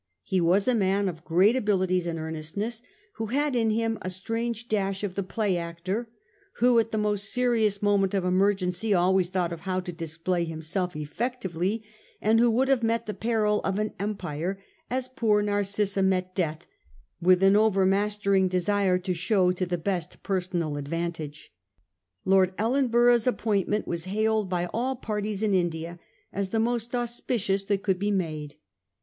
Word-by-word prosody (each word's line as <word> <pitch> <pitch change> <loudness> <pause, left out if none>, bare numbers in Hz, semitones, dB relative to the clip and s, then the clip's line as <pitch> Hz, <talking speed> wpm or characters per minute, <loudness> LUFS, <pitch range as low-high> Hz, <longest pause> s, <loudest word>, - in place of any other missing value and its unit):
He 185 - 0
was 185 +6 +3
a 255 - +4
man 200 -2 +2
of 165 -3 -5
great 185 +8 +4
abilities 185 -6 +1
and 165 -1 -2
earnestness, 160 +9 -4 0.4
who 225 0 -3
had 285 +4 0
in 225 -2 +2
him 225 0 0
a 185 - -3
strange 225 +5 -3
dash 195 -2 -1
of 200 -3 -2
the 200 - -2
play 200 -1 -1
actor, 175 +7 -4 0.4
who 245 -1 +4
at 225 0 0
the 220 - -1
most 205 -1 0
serious 225 -5 +1
moment 200 -1 +2
of 190 -2 0
emergency 190 +2 +1
always 180 0 +3
thought 180 -2 -1
of 170 - -7
how 185 +1 -2
to 180 -1 -6
display 165 +1 -2
himself 165 +2 -3
effectively, 195 - -3 0.4
and 220 +2 +3
who 240 0 +5
would 250 +4 +2
have 270 -3 +3
met 230 0 0
the 210 - -4
peril 215 -2 +1
of 195 0 -1
an 215 0 -1
empire 190 -3 -3 0.3
as 255 +1 -1
poor 225 -5 +1
Nar 205 0 +1
cissa 200 0 0
met 185 -1 +1
death, 160 -3 -2 0.6
with 180 +2 +4
an 195 +1 +6
overmastering 200 -1 +2
desire 185 +1 +1
to 180 0 -2
show 185 +1 +2
to 180 0 -2
the 175 0 -1
best 175 -1 -3
personal 175 -5 -1
advantage. 155 - -5 0.7
Lord 190 -1 +3
Ellenborough's 240 0 +3
appointment 210 -3 0
was 170 0 -3
hail 215 +3 +1
ed 195 - -7
by 175 -1 0
all 255 +4 -1
parties 215 -3 -3
in 210 -2 +2
India 170 -1 -1 0.3
as 195 0 -2
the 225 - 0
most 235 +1 -1
auspicious 235 -4 -1
that 200 -1 0
could 190 -3 +1
be 205 +1 0
made. 155 -7 -2
195 Hz, 170 wpm, -27 LUFS, 180-220 Hz, 0.7 s, an